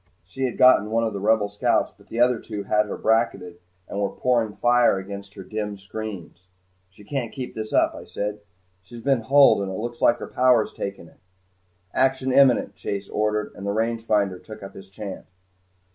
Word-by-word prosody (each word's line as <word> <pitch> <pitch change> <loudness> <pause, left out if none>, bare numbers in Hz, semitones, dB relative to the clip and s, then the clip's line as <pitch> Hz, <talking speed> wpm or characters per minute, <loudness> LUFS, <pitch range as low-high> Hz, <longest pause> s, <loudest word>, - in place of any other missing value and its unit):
She 130 +9 -3
had 125 - -3
gotten 125 -5 +6
one 115 +1 +1
of 110 -2 -1
the 100 - -4
Rebel 105 +1 +2
scouts 100 0 0
but - - -22
the 115 - -5
other 120 -1 +4
two 105 -3 -6
had 105 0 +1
her - - -5
bracketed 100 -6 0 0.3
and 100 - -5
were 100 - +1
pouring 115 -4 0
fire 120 -4 +3
against 100 +1 -8
her 95 - -8
dim 105 +1 -4
screens. 100 -3 -8 0.4
"She 100 +2 -18
can't 120 +1 -3
keep 130 -3 -6
this 110 0 -6
up," - - +3
I - - -10
said. 105 +1 -4 0.4
"She's 115 +5 -12
been 135 -4 +2
hulled 135 -1 +5
and 100 - -3
it 95 - -5
looks 120 +2 -5
like 120 - +4
her - - -6
power's 125 -3 +2
taken 100 -4 -6
it." - - -22 0.7
"Action 130 0 +1
imminent," 130 -6 +4
Chase 100 0 -5
ordered, 105 0 -1
and - - -9
the 100 0 -1
rangefinder 110 -4 0
took 110 -2 -10
up 95 - -9
his 95 0 -12
chant. 100 -1 -8
110 Hz, 195 wpm, -24 LUFS, 100-120 Hz, 0.7 s, gotten